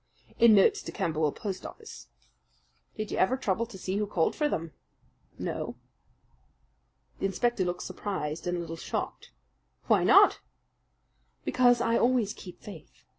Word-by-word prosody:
"In 230 -2 +7
notes 195 - +4
to - - -7
Camberwell 155 -2 0
post 195 +2 -5
office." 440 - -10 0.9
"Did 215 -1 -4
you - - -2
ever 250 +8 +3
trouble 225 -1 -1
to 215 - -11
see 190 +1 -3
who 210 0 -1
called 170 -5 0
for 300 -1 +1
them?" 165 - -3 0.6
"No." - - -4 1.4
The 195 - +1
inspector 220 +2 0
looked 180 0 -3
surprised 165 -5 -4
and 175 0 0
a - - -3
little 165 -1 -6
shocked. - - -5 0.6
"Why - - +3
not?" - - +6 1.1
"Because 245 -1 +4
I 230 -1 +2
always 240 -4 +2
keep 180 -5 -11
faith. 195 -7 -12
195 Hz, 145 wpm, -28 LUFS, 175-235 Hz, 1.4 s, In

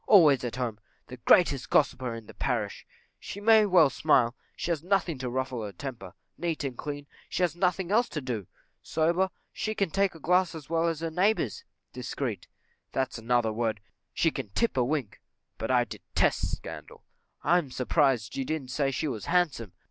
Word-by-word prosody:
Always 155 - +7
at 120 -1 -3
home! 120 -4 -3 0.3
the 125 - -8
greatest 140 0 +4
gossiper 130 -4 +2
in 115 -1 -9
the - - -12
parish; - - -2 0.3
she 205 - -7
may 215 0 +6
well 170 -7 +6
smile, 125 -5 +3 0.2
she 175 - -2
has 160 -2 -1
nothing 180 -5 +1
to 130 -1 -3
ruffle 130 -2 -2
her 105 - -5
temper; 130 +2 -8 0.2
neat 165 -3 -2
and 135 -3 -3
clean 145 +2 -5 0.2
she 185 - 0
has 170 -2 +1
nothing 180 0 0
else 235 +3 +3
to 150 - -3
do; 120 - -4 0.3
sober 170 +4 +1 0.2
she 215 0 -2
can 195 -5 0
take 195 -2 +1
a - - -11
glass 180 +2 +2
as 155 -1 -9
well 165 0 +2
as 165 -2 -2
her 165 -1 -2
neighbours; 180 - +1 0.3
discreet 125 -5 -4 0.4
that's 130 -3 -1
another 115 -1 +1
word, 110 -1 -1 0.3
she - - +2
can - - -5
tip 235 - +1
a 125 - +3
wink: 130 -5 -2 0.4
but - - -3
I - - +4
detest - - 0
scandal; - - -10 0.4
I 175 +1 +4
am 150 -6 -5
surprised 130 -3 +1
you 135 - -1
didn't 135 -3 -3
say 135 +1 +1
she 135 +3 -2
was 115 -7 -4
handsome? 155 - +1
145 Hz, 185 wpm, -28 LUFS, 125-175 Hz, 0.4 s, Always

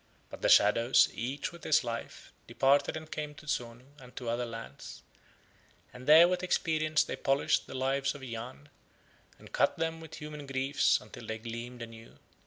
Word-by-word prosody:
But - - -9
the - - +2
shadows, 115 +5 +5
each 130 +5 -4
with 170 -1 -14
his 155 - +3
Life, 115 -1 -6
departed 140 +3 +2
and 155 0 -10
came 150 -1 -5
to 150 - -14
Zonu 120 -4 -4
and 125 -1 -15
to 125 -3 -5
other 120 +1 -1
lands, 115 - -9 0.9
and 125 0 -11
there 160 +3 +9
with 180 0 -1
experience 155 -4 +1
they - - -5
polished 135 +1 +1
the - - -8
Lives 135 +2 0
of 140 - -10
Yahn, 125 +4 -8 0.7
and - - -15
cut - - +2
them 165 0 -2
with 160 -1 -10
human 150 -2 -8
griefs 135 +1 +2
until - - -12
they 110 - -3
gleamed 115 +2 -7
anew. 115 0 -12
135 Hz, 175 wpm, -30 LUFS, 120-150 Hz, 0.9 s, there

